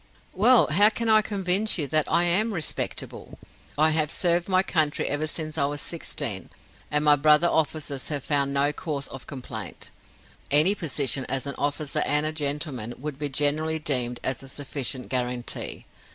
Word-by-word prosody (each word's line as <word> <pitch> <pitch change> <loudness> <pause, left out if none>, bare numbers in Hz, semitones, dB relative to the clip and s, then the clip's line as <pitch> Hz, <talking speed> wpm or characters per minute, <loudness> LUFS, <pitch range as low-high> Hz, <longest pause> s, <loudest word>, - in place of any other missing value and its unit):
"Well, 235 +5 +5
how 205 +7 +5
can 230 +1 -3
I 215 0 +6
convince 200 0 +1
you 155 - 0
that 155 +1 +1
I 170 +2 +3
am 200 +5 +1
respectable? 160 - -4 0.4
I 155 +1 +4
have 155 -1 0
served 175 +1 +2
my 185 0 +3
country 155 -6 0
ever 145 +2 -1
since 155 0 -4
I 140 - +3
was 145 +1 -3
sixteen, 115 - -2 0.4
and 150 0 0
my 150 -1 +7
brother 150 +3 +4
officers 155 -4 -1
have 145 -3 -3
found 140 -2 +1
no 140 +1 +2
cause 145 -3 -4
of 135 - -10
complaint 120 - -8 0.6
any 155 +7 +6
position 140 -7 -1
as 135 0 -1
an 140 - -3
officer 145 +1 -2
and 150 0 +1
a 155 - 0
gentleman 145 -6 -2
would 145 +1 -7
be 145 -1 -1
generally 150 +3 +1
deemed 125 -6 +1
a 130 - +1
sufficient 135 -1 -5
guarantee. 125 -1 -3
150 Hz, 165 wpm, -25 LUFS, 140-165 Hz, 0.6 s, my